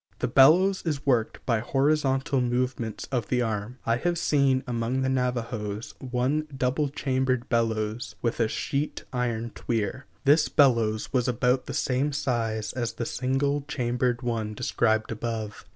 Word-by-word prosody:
The - - -1
bellows 170 +10 +5
is 150 -4 -3
worked 120 -5 0
by 115 -3 +2
horizontal 135 +1 +1
movements 125 -2 -1
of 120 -5 -1
the 125 -1 +1
arm. 110 +2 -3
I 115 0 +2
have 175 +6 0
seen 140 -4 +2
among 120 +1 -1
the 130 - +1
Navajos 115 -4 -2
one 130 +4 -1
double 135 +3 +1
chambered 130 -2 -1
bellows 115 -1 -1
with 115 0 -2
a 115 - +3
sheet 140 +6 -2
iron 120 -2 -1
tweer. 115 +4 -3 0.2
This 150 +2 +4
bellows 115 -6 +2
was 125 -2 +2
about 125 +1 +1
the - - -4
same 135 +3 0
size 115 -5 -1
as 120 -3 -2
the 115 +1 -4
single 135 +4 0
chambered 125 0 -1
one 110 -3 -2
described 110 0 +1
above. 110 -1 -4
125 Hz, 150 wpm, -26 LUFS, 115-135 Hz, 0.2 s, bellows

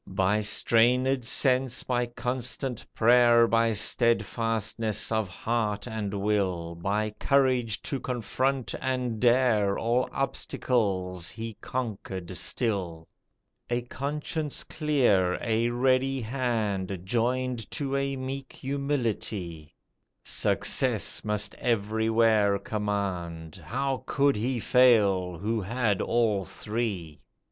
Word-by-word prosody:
By 95 +2 +1
strainèd 120 +5 +2
sense, 130 0 +1
by 125 -1 0
constant 125 +1 -3
prayer, 120 0 +6
By 115 0 +2
steadfastness 110 0 +1
of 110 -2 +1
heart 105 +2 -2
and 105 -3 -3
will, 95 -5 0
By 105 +5 -1
courage 130 -6 +2
to 135 - -2
confront 130 +2 -2
and 125 -4 -2
dare, 120 -5 +3
All 120 +2 0
obstacles 95 -9 -1
he 115 +3 -6
conquered 95 -7 -5
still; 90 -4 -2 0.6
A 120 0 -1
conscience 145 +4 -3
clear, 120 - +2
a 115 +1 0
ready 130 +2 +1
hand, 110 -6 -2
Joined 120 +3 -1
to 140 -3 -2
a 140 0 -1
meek 135 +1 -6
humility, 115 - -3 0.5
Success - - +1
must 105 -1 -1
everywhere 110 -2 +2
command, 95 -6 -4
How 135 - -2
could 140 0 +2
he 120 +4 -1
fail 105 -8 +3
who 110 +4 -1
had 110 0 0
all 110 -4 +1
three! 100 -7 -4
115 Hz, 100 wpm, -27 LUFS, 100-125 Hz, 0.6 s, prayer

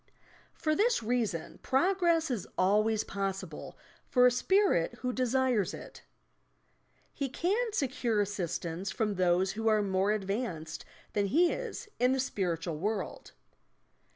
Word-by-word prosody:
For 310 - 0
this 430 - +2
reason 220 -8 -2
progress 335 +1 +2
is 220 -7 -3
always 210 +3 +3
possible 195 -4 -5 0.3
for 250 -1 +4
a 250 - +6
Spirit 310 - +2
who 250 -1 -1
desires 255 -4 +1
it. - - -11 1.1
He 275 -3 -3
can 415 - 0
secure 255 - 0
assistance 185 -2 -2
from 210 +3 -1
those 185 0 +2
who 225 +3 -3
are 215 -1 +4
more 195 +1 +1
advanced 195 -5 -3 0.3
than 205 -1 +1
he 335 - +4
is - - -5
in 250 +2 +4
the 265 - 0
spiritual 170 -9 -2
world. 210 +3 -3
220 Hz, 125 wpm, -30 LUFS, 190-265 Hz, 1.1 s, a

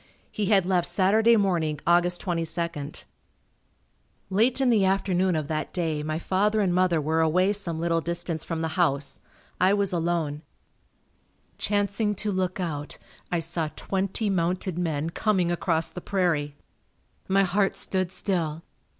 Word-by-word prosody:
He 210 -2 -2
had 195 -3 +4
left 180 -2 +2
Saturday 210 +6 +4
morning, 170 -7 0
Aug. 175 0 +4
22nd. 170 -4 -3 1.3
Late 230 +7 +2
in 260 -2 +3
the 215 -4 +4
afternoon 190 -1 +1
of 155 -2 -2
that 155 0 -3
day 160 -4 -1
my 155 +1 -2
father 205 +5 +1
and 190 -4 +2
mother 180 -2 +3
were 160 +2 +1
away 180 +5 +3
some 180 -6 -2
little 165 0 +1
distance 170 -1 -3
from 165 -1 -3
the 160 - -1
house. 140 -4 0 0.4
I 185 +2 +4
was 200 -2 0
alone. 165 -3 -1 1.2
Chancing 205 +1 0
to 210 +1 -1
look 185 0 -1
out 150 -5 -4 0.3
I 175 - +2
saw 165 -1 -2
twenty 195 +3 -2
mounted 180 -1 0
men 160 -2 -1
coming 185 -3 +1
across 165 -2 0
the 180 - -7
prairie. 165 -8 0 0.7
My 195 +1 +3
heart 195 +1 +1
stood 185 -2 -1
still. 170 -5 -2
175 Hz, 145 wpm, -26 LUFS, 165-195 Hz, 1.3 s, had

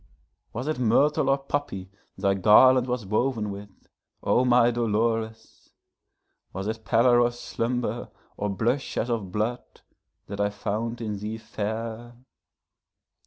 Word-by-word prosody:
Was 125 +5 -5
it 155 -4 -1
myrtle 135 +4 +3
or 135 - +4
poppy 135 -9 -4 0.3
thy 100 -1 +2
garland 125 +6 +6
was 125 -3 -2
woven 110 +1 0
with, 100 +1 -8 0.5
O 125 - +3
my 120 -1 +4
Dolores? 115 -1 -2 0.8
Was 95 +1 -4
it 110 +1 -4
pallor 120 +2 +4
or 120 - +4
slumber, 120 0 -3 0.3
or 105 - -2
blush 115 +8 -1
as 120 - -1
of 105 -6 -2
blood, 110 +5 -3 0.4
that 100 0 -5
I 100 - +2
found 110 +3 -3
in 105 -3 -3
thee 105 +2 -4
fair? 110 +2 -5
115 Hz, 130 wpm, -26 LUFS, 105-120 Hz, 0.8 s, garland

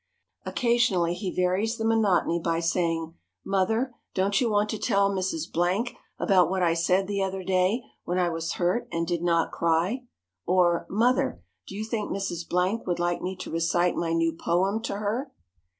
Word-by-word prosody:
Occasionally 235 -8 +2
he 185 +2 -4
varies 185 +6 0
the 225 - -2
monotony 205 -6 +2
by 165 0 0
saying, 165 -1 0 0.3
"Mother, 220 +6 +1 0.2
don't 195 +3 +2
you 240 - +2
want 210 0 +1
to 220 - -4
tell 200 0 +2
Mrs. 185 -5 -1
Blank 185 +8 0 0.2
about 180 -4 +3
what 190 -1 0
I 170 -1 +3
said 180 +3 +2
the 200 0 -2
other 190 0 -2
day 185 +6 +1 0.2
when 180 - -2
I 180 -1 +2
was 165 0 -3
hurt 180 +7 0
and 165 0 -1
did 170 0 -1
not 170 -1 +1
cry?" 170 +10 0 0.4
Or, 175 -1 +2
"Mother, 225 - +1 0.2
do 195 - -8
you 215 +2 -3
think 220 -1 -3
Mrs. 175 -4 -3
Blank 185 +5 0
would 175 - 0
like 175 0 -1
me 185 +1 -3
to - - -7
recite 170 +2 +1
my 165 -1 -1
new 165 0 +1
poem 190 +6 0
to - - -3
her?" 220 +7 -2
185 Hz, 180 wpm, -26 LUFS, 170-205 Hz, 0.4 s, about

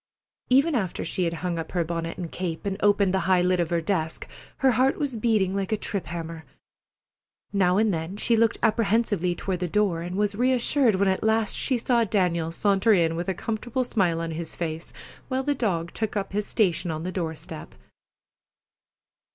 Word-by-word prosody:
Even 275 +6 +4
after 195 -9 -1
she 180 +2 -1
had 165 - -1
hung 170 -2 -1
up 160 - -6
her 175 -2 +1
bonnet 165 0 -4
and 175 -3 -5
cape, 175 -2 -4
and 195 -1 -1
opened 205 -2 +3
the 190 - +2
high 180 -1 +4
lid 180 0 +2
of 170 -2 0
her 170 -1 +1
desk, 160 -2 -2 0.3
her 265 -1 +4
heart 260 +3 +2
was 285 -5 -2
beating 215 -4 +1
like 195 0 -2
a 215 - +2
trip 200 -5 -4
hammer. 165 0 -6 1.1
Now 185 -2 +3
and 215 -1 +3
then 165 +4 -4
she 230 +2 +2
looked 225 -1 +3
apprehensively 210 -5 +2
toward 185 0 -3
the 180 - -1
door, 185 -2 +1
and 175 +2 -5
was 205 0 +1
reassured 250 0 +3
when 195 +1 +2
at 190 0 +1
last 220 0 +1
she 260 - 0
saw 235 0 +2
Daniel 180 -6 0
saunter 200 +4 +3
in 165 -4 +2
with 175 +3 -3
a 190 - -1
comfortable 235 +6 -2
smile 185 -9 +1
on 165 0 -3
his 160 0 -5
face, 165 -1 -4 0.4
while 260 0 -1
the 290 +1 +1
dog 180 -10 -1
took 220 -1 -2
up 195 -1 -3
his 210 0 -1
station 180 -5 +1
on 160 0 -3
the 185 - -3
door 165 -4 -3
step. - - -9
190 Hz, 200 wpm, -25 LUFS, 170-220 Hz, 1.1 s, Even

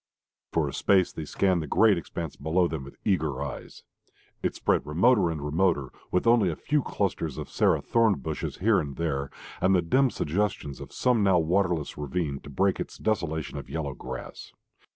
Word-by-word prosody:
For - - +1
a - - -5
space 95 -3 +3
they 80 - -5
scanned 90 +2 +1
the 75 - -5
great 110 +6 +5
expanse 85 -2 -5
below 85 +4 +1
them 80 -5 -4
with 70 - -12
eager 80 -9 0
eyes. - - -8 0.6
It - - -1
spread - - +1
remoter 95 +5 +3
and 75 -3 -4
remoter, 75 -3 +1 0.2
with 90 - 0
only 115 -5 +5
a 80 - -2
few 150 - 0
clusters 85 - -2
of - - -6
sere - - +3
thorn 115 -3 +3
bushes 65 - -4
here 105 +2 +3
and 70 -2 -4
there, 70 -5 -2 0.3
and 95 +2 +4
the 90 - +4
dim 130 +11 +3
suggestions 95 - -2
of - - -9
some 125 -3 +2
now 95 -3 +4
waterless 85 -3 0
ravine, 75 -1 -2
to - - -12
break 95 +7 +1
its - - -5
desolation 80 -8 -2
of - - -10
yellow 75 -4 -3
grass. 65 0 -8
85 Hz, 185 wpm, -27 LUFS, 75-100 Hz, 0.6 s, great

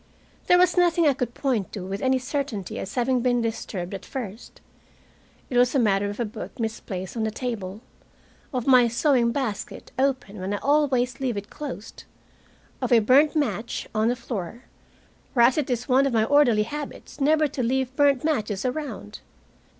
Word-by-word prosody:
There 355 - +6
was 360 0 +3
nothing 345 -1 +4
I 290 - +5
could 245 -2 -4
point 245 -9 -1
to 190 -3 -5
with 195 +2 -4
any 260 0 +2
certainty 255 - -3
as 190 - -6
having 250 0 +1
been 245 0 +2
disturbed 220 -5 -4
at 195 - -6
first. 230 -4 -7 0.9
It 250 - -2
was 250 +2 +4
a - - +4
matter 205 -3 +2
of 205 - -7
a 240 - 0
book 215 +4 -8
misplaced 205 -4 -4
on 230 - -2
the 220 - 0
table, 215 -4 -5 0.7
of 250 -4 -2
my 255 -3 +6
sewing 240 0 +2
basket 235 -6 -4
open 260 -7 0
when 190 +2 -2
I - - -2
always 270 -2 +1
leave 250 -5 -1
it 200 0 -6
closed, 270 -8 -8 0.8
of - - -2
a 240 - +7
burnt 265 +8 +4
match 235 -6 -2
on 215 0 +2
the 245 - +2
floor, 235 -1 -6 0.7
whereas 245 +4 +5
it 285 - -2
is 245 -1 -2
one 270 +1 +4
of 265 - -2
my 220 -1 +3
orderly 245 -4 +4
habits 290 +4 -7
never 305 +2 +4
to 270 -1 -4
leave 260 +1 0
burnt 280 -3 +3
matches 215 -10 -1
around. 250 - -4
245 Hz, 180 wpm, -25 LUFS, 215-275 Hz, 0.9 s, a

